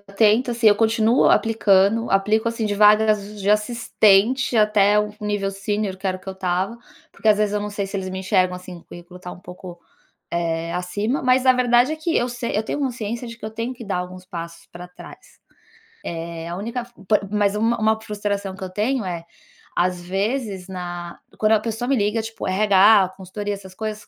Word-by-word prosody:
tento, 210 +5 +2
assim, 235 -1 0
eu 205 - +8
continuo 225 +2 +3
aplicando, 220 0 +3
aplico, 215 +4 +2
assim, 230 -1 -2
de 205 - -1
vagas 210 0 +3
de 195 - -2
assistente 220 +2 +3
até 210 -1 +4
o 210 0 -1
nível 205 -1 -1
sênior, 195 0 -3
que 195 - -24
era 185 0 0
o - - -16
que - - -11
eu - - -3
estava, 190 +4 -2 0.4
porque 220 - -2
às 210 -1 +5
vezes 210 -1 +1
eu 205 - 0
não 210 0 -4
sei 200 -1 -3
se 195 +1 -5
eles 190 -1 -4
me 190 0 -5
enxergam 185 -1 +1
assim, 180 -1 -10
o - - -19
currículo 175 +1 -12
tá 180 - -8
um - - -10
pouco, 180 -1 -11 0.5
eh, 165 -1 -2
acima, 205 +9 -2
mas 255 +1 +3
a 255 - +7
verdade 245 +2 +3
é - - -1
que 320 +1 -2
eu 245 +1 +1
sei 245 -2 -4
eu - - +2
tenho 290 - -3
consciência 235 -3 -3
de 230 - -8
que 215 - -9
eu 215 - -5
tenho 230 +3 -4
que 245 -1 -11
dar 195 -2 -2
alguns 180 0 -7
passos 170 -2 -8
pra 175 +1 -9
trás. 180 - -15 0.8
Eh, 165 0 -7
a 170 - -5
única 235 +5 -4
fo 240 -5 -19
por 200 0 +1
mas 205 -1 +1
uma 230 +2 +1
uma 220 0 +2
frustração 205 -2 -3
que 190 - -9
eu 185 - -5
tenho 220 +6 -1
é, 170 -2 -5 0.5
às 180 0 +1
vezes 195 +1 -3
na 175 -2 -7 0.2
quando 215 0 +2
a 215 - +4
pessoa 230 +2 -4
me 275 - +2
liga, 210 +1 0
tipo 225 -2 -6
RH, 195 0 +5
consultoria, 205 +2 -5
essas 190 -1 -12
coisas, 215 0 -5
205 Hz, 210 wpm, -22 LUFS, 185-225 Hz, 0.8 s, eu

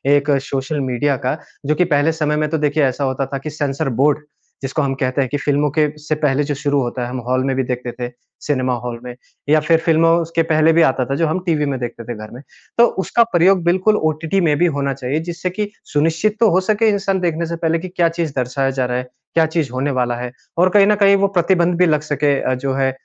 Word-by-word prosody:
एक 145 +1 0
social 135 +2 -3
media 135 +2 0
का। 130 +4 0 0.3
जो 150 +2 +1
कि 180 - +3
पहले 145 +3 +3
समय 150 -2 -1
में 155 0 0
तो 160 - 0
देखिए 150 0 +1
ऐसा 130 +2 -1
होता 135 0 -1
था - - 0
कि 135 +3 -6
सेंसर 145 -1 -2
बोर्ड 150 +1 +3 0.4
जिसको 135 +3 -2
हम 140 -2 0
कहते 130 +1 -1
हैं 130 - -1
कि 145 - -1
फ़िल्मों 145 +1 +1
के 155 -1 +4
से 155 +1 -2
पहले 145 -2 +1
जो 145 0 -2
शुरू 140 0 0
होता 125 0 -3
है, 120 - -4
हम 130 +1 -4
हॉल 130 +1 +1
में 135 -1 0
भी 130 - 0
देखते 125 -1 -4
थे, 120 0 -5 0.3
सिनेमा 130 -3 0
हॉल 120 -1 -5
में 125 -1 -8 0.3
या 155 +1 +5
फिर 160 +2 +3
फ़िल्मों 165 0 +4
उसके 165 0 0
पहले 155 +1 +4
भी 165 - +4
आता 130 -1 -1
था, 135 - -2
जो 165 +3 +1
हम 160 +4 -1
टीवी 155 -4 +1
में 135 -2 -2
देखते 120 -1 -6
थे 120 +1 -6
घर 110 0 -9
में। 125 - -10 0.4
तो 235 - +7 0.2
उसका 235 - +3
प्रयोग 180 +1 +4
बिल्कुल 185 +5 +2 0.2
ओटीटी 165 +5 -1
में 155 -4 +2
भी 175 - +3
होना 140 -1 -1
चाहिए 135 +2 -2
जिससे 175 +2 -3
कि 205 +3 -3 0.2
सुनिश्चित 165 +8 +1
तो 230 - +5
हो 180 - +4
सके 215 +1 +3
इंसान 195 -2 0
देखने 170 -2 -1
से 170 - -3
पहले 165 0 0
कि 185 - -6
क्या 175 -2 +1
चीज़ 165 -3 -3
दर्शाया 130 +1 -1
जा 130 -1 -1
रहा 125 0 -1
है, 125 0 -4 0.3
क्या 165 -1 +4
चीज़ 160 -4 -2
होने 130 +3 -1
वाला 125 -2 0
है 125 0 -5 0.3
और 180 +2 +4
कहीं 200 +1 +5
न 210 - +4
कहीं 200 -1 +5
वो 200 0 +2
प्रतिबंध 175 0 +2
भी 180 - +4
लग 155 -3 +2
सके 145 -2 0
अ, - - 0
जो 135 +1 -2
है 135 0 +1
150 Hz, 255 wpm, -18 LUFS, 135-165 Hz, 0.4 s, तो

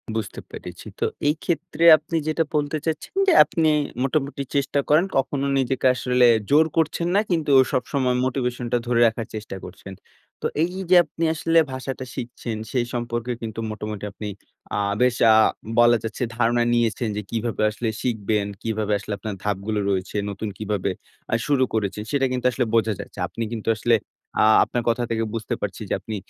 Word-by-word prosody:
বুঝতে 110 -5 -4
পেরেছি। - - -9
তো - - +1 0.2
এই 150 - +3
ক্ষেত্রে 170 -1 -2
আপনি 155 +2 -6
যেটা 155 +1 +1
বলতে 150 +1 0
চাচ্ছেন 160 - -3
যে, 370 - +6
আপনি 160 -2 +1 0.3
মোটামুটি 140 0 -1
চেষ্টা 140 0 +1
করেন। 155 +5 +5
কখনো 135 +1 0
নিজেকে 130 0 +1
আসলে 125 0 +3 0.2
জোর 150 +3 +6
করছেন 165 +1 +1
না। - - +6
কিন্তু 160 -4 +1 0.2
সবসময় 130 -1 0
মোটিভেশন 125 -2 -2
টা 120 - +3
ধরে 120 -1 +2
রাখার 115 0 -3
চেষ্টা 105 -2 -6
করছেন। 95 +1 -10 0.5
তো - - +1 0.2
এই 175 +2 -2 0.2
যে, 185 - +6
আপনি 165 - -5
আসলে 165 +1 +1 0.2
ভাষাটা 130 0 -5
শিখছেন 120 -3 -5
সেই 125 -2 +1
সম্পর্কে 120 0 -3
কিন্তু 110 -1 -5
মোটামুটি 105 -1 -6
আপনি 105 +1 -7 0.5
আ - - +1 0.2
বেশ 125 -1 +3 0.2
আ - - +6 0.4
বলা 120 0 +6
যাচ্ছে 115 +3 -3
ধারণা 120 0 +2
নিয়েছেন 120 0 +1
যে, - - -1
কিভাবে 115 -1 -2
আসলে 115 +1 -3
শিখবেন? 105 -4 0 0.2
কিভাবে 110 -2 -2
আসলে 105 +1 -5
আপনার 105 0 -5
ধাপগুলো 105 +1 -1
রয়েছে? 95 +1 -2
নতুন 100 +2 -4
কীভাবে 105 -3 -2 0.4
আ - - +5
শুরু 140 -3 +3
করেছেন? 105 -1 -1
সেটা 140 -2 +2
কিন্তু 125 0 -3
আসলে 125 -1 0
বোঝা 110 -1 +3
যাচ্ছে। - - -9
আপনি 115 - -5
কিন্তু 115 -1 -3
আসলে 115 +1 +3 0.5
আ - - +6 0.2
আপনার 120 - -2
কথা 120 +1 +1
থেকে 115 -1 0
বুঝতে 115 -2 -3
পারছি - - -4
যে, - - 0
আপনি 110 - -6
120 Hz, 175 wpm, -23 LUFS, 110-140 Hz, 0.5 s, যে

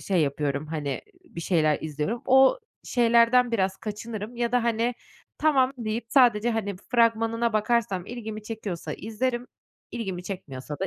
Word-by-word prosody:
şey 185 -4 +1
yapıyorum, 140 +1 -1
hani, 150 -2 -4
ııı, 355 - -8
bir - - -3
şeyler 155 -4 +2
izliyorum. 155 +10 -3
O 265 - +6 0.3
şeylerden 235 0 +4
biraz 190 -3 +1
kaçınırım 215 +2 -6
ya 235 0 -1
da, 245 -1 +2
hani, 235 +1 +1 0.4
tamam, 270 -4 +3
deyip 225 0 -3
sadece, 240 -3 +4
hani, 210 -3 -2 0.2
fragmanına 230 -1 +2
bakarsam 215 -4 0
ilgimi 220 -3 -6
çekiyorsa 210 -5 -5
izlerim, 240 +3 -2 0.4
ilgimi 190 -6 -4
çekmiyorsa 150 -7 -7
da 190 - 0
225 Hz, 145 wpm, -26 LUFS, 190-240 Hz, 0.4 s, O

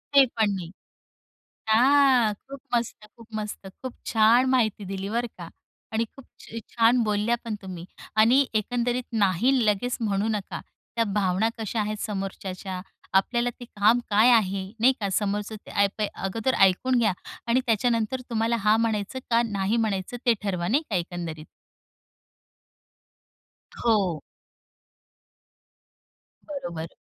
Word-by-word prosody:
ते 275 - +8
पण 215 -2 +3
नाही. 175 -2 -6 1.0
हां, 255 -1 +5
खूप 270 +6 -12 0.2
मस्त, 235 -2 -2
खूप 230 - -14
मस्तं. 210 -2 -5
खूप 260 -2 -5
छान 230 +3 +4
माहिती 220 -6 +1
दिली 195 +1 -4
बरं 235 +2 -1
का 170 -2 -8 0.4
आणि 225 +1 +1
खूपच 230 -3 -11
छान 235 +1 +4
बोलल्या 210 +2 +1
पण 220 - -3
तुम्ही 180 -3 -8 0.3
आणि 245 +6 +5
एकंदरीत 245 +2 -1 0.2
नाही 195 +8 +3
लगेच 210 +4 0
म्हणू 205 -1 0
नका. 195 - -6 0.4
त्या 230 - +2
भावना 195 +1 +1
कशा 220 0 -3
आहेत 215 +1 -2
समोरच्याच्या, 190 -2 -5 0.3
आपल्याला 240 +5 +2
ते 245 - -8
काम 215 +2 +3
काय 215 +4 +5
आहे 195 -4 +2 0.2
नाही 260 +3 +5
का. 200 -2 -1
समोरच्याचं 205 +2 -2
काय 200 0 +3
ते 210 - +1
अगोदर 225 +7 -1 0.2
ऐकून 255 +8 0
घ्या 215 -4 +2 0.3
आणि 240 +2 +3
त्याच्यानंतर 230 +1 +1
तुम्हाला 230 0 +1
हां 215 +1 +5
म्हणायचं 220 +2 -1
का 235 0 +4
नाही 200 +1 -1
म्हणायचं 215 0 -1
ते 240 - +5
ठरवा. 180 -4 -1
नाही 280 - +2
का 205 - -1
एकंदरीत? 170 -3 -4 2.3
हो. 200 -9 +1 2.3
बरोबर. 175 - -5
215 Hz, 130 wpm, -25 LUFS, 195-240 Hz, 2.3 s, ते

